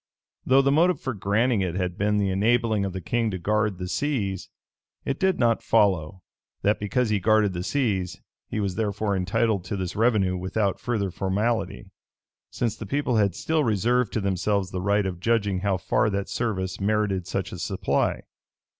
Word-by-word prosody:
Though 135 Hz, +1 st, +5 dB
the 140 Hz, -, +3 dB
motive 170 Hz, +5 st, +3 dB
for 130 Hz, -, -3 dB
granting 105 Hz, +3 st, +1 dB
it 90 Hz, -2 st, -2 dB
had 90 Hz, -2 st, -2 dB
been 105 Hz, +2 st, +1 dB
the 100 Hz, -2 st, +1 dB
enabling 110 Hz, +1 st, +2 dB
of 95 Hz, -, -4 dB
the 95 Hz, -, -5 dB
king 115 Hz, +7 st, 0 dB
to 95 Hz, -, -3 dB
guard 105 Hz, +2 st, 0 dB
the 90 Hz, 0 st, -5 dB
seas, 100 Hz, -6 st, -2 dB, 0.6 s
it 135 Hz, -, -2 dB
did 190 Hz, -1 st, +2 dB
not 115 Hz, -2 st, +2 dB
follow, 95 Hz, -3 st, +1 dB, 0.4 s
that 105 Hz, +1 st, +2 dB
because 105 Hz, +3 st, 0 dB
he 105 Hz, -, +2 dB
guarded 110 Hz, 0 st, +3 dB
the 90 Hz, -, -3 dB
seas, 95 Hz, -, -1 dB, 0.3 s
he 110 Hz, -, -2 dB
was 100 Hz, -3 st, -1 dB
therefore 105 Hz, 0 st, -1 dB
entitled 100 Hz, +2 st, 0 dB
to 100 Hz, -, -3 dB
this 95 Hz, -1 st, -4 dB
revenue 105 Hz, -5 st, +2 dB
without 95 Hz, +2 st, -1 dB
further 105 Hz, -6 st, -1 dB
formality: 105 Hz, +6 st, -2 dB, 0.6 s
since 115 Hz, -3 st, -2 dB
the 110 Hz, -2 st, -8 dB
people 135 Hz, 0 st, 0 dB
had 100 Hz, -4 st, +2 dB
still 160 Hz, -1 st, 0 dB
reserved 115 Hz, +1 st, +1 dB
to 110 Hz, -, 0 dB
themselves 95 Hz, 0 st, 0 dB
the 90 Hz, -, -3 dB
right 100 Hz, +1 st, +2 dB
of 90 Hz, -2 st, -3 dB
judging 105 Hz, -2 st, +1 dB
how 100 Hz, -1 st, 0 dB
far 110 Hz, +5 st, +1 dB
that 100 Hz, -1 st, -2 dB
service 95 Hz, -6 st, -2 dB
merited 100 Hz, -3 st, 0 dB
such 95 Hz, -1 st, -3 dB
a 90 Hz, -, -7 dB
supply. 95 Hz, +2 st, 0 dB
105 Hz, 180 wpm, -25 LUFS, 95-115 Hz, 0.6 s, Though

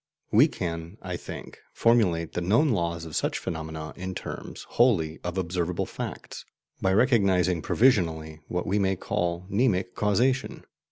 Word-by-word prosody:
We -, -, +7 dB
can, 85 Hz, +2 st, -5 dB
I 90 Hz, -1 st, -3 dB
think, -, -, -8 dB
formulate 95 Hz, -9 st, +2 dB
the 90 Hz, -, -2 dB
known 115 Hz, -, +3 dB
laws 85 Hz, -6 st, -1 dB
of 80 Hz, -, -7 dB
such -, -, 0 dB
phenomena 80 Hz, -3 st, -5 dB
in 95 Hz, 0 st, -5 dB
terms, -, -, -7 dB
wholly, 90 Hz, -11 st, +2 dB
of 90 Hz, +1 st, -4 dB
observable 90 Hz, -1 st, -1 dB
facts, -, -, -7 dB, 0.4 s
by 95 Hz, -, +2 dB
recognizing 95 Hz, -, +3 dB
provisionally 80 Hz, -, +2 dB
what 90 Hz, -, -2 dB
we 100 Hz, +3 st, +1 dB
may 95 Hz, -1 st, +2 dB
call 85 Hz, 0 st, -2 dB
"mnemic 100 Hz, -3 st, +1 dB
causation." 125 Hz, +6 st, 0 dB
90 Hz, 145 wpm, -27 LUFS, 85-105 Hz, 0.4 s, We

